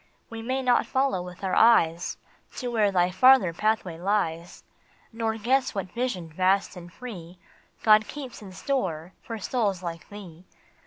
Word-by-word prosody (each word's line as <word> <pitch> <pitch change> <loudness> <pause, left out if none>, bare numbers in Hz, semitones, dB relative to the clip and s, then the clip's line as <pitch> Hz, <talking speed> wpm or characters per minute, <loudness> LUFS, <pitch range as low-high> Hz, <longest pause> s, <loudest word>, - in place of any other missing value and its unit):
We 225 0 -6
may 260 +3 -2
not 245 -1 +3
follow 265 -8 0
with 180 +1 -10
our 190 - -1
eyes 175 -7 +4 0.4
To 250 - -4
where 220 -4 +2
thy 180 -1 +2
farther 215 -2 +5
pathway 190 -4 -1
lies, 175 -3 -2 0.5
Nor 225 -1 -2
guess 255 +4 +1
what 190 -2 -4
vision 235 -8 -3
vast 185 +5 +1
and 175 -1 -11
free 180 -7 -9 0.5
God 215 -1 +5
keeps 270 -6 -8
in 195 -3 -10
store 185 - -3
for 230 - -6
souls 205 -4 -1
like 165 -2 -6
thee. 185 -4 -12
200 Hz, 155 wpm, -26 LUFS, 175-235 Hz, 0.5 s, farther